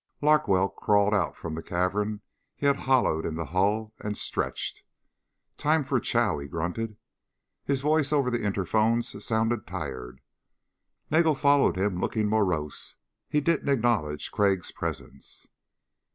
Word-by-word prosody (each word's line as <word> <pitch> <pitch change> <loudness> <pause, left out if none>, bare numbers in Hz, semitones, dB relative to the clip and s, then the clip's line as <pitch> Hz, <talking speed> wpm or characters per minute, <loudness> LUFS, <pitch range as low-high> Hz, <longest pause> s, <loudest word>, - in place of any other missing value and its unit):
Larkwell 145 -11 +3
crawled 105 0 +2
out 100 - +1
from 80 - -6
the 80 - -4
cavern 105 +5 -1 0.3
he - - -5
had 140 0 +4
hollowed 130 - +2
in 80 - -3
the 80 0 -3
hull 105 +4 0
and 105 0 -4
stretched. - - -2 0.8
"Time 155 +1 +2
for 130 -1 0
chow," 115 -7 +1
he 70 - -7
grunted. 90 +8 -4 0.7
His 140 -1 0
voice 150 0 +2
over 140 -4 +2
the 120 -2 -1
interphones 110 +4 +1
sounded 115 +1 0
tired. 65 -1 -6 0.9
Nagel 160 0 +4
followed 140 -5 +3
him 95 -1 0
looking 110 -1 0
morose. 90 -9 -1 0.3
He 150 - +1
didn't 155 -1 0
acknowledge 115 - 0
Crag's 100 -3 +1
presence. 70 0 -7
110 Hz, 135 wpm, -27 LUFS, 90-135 Hz, 0.9 s, had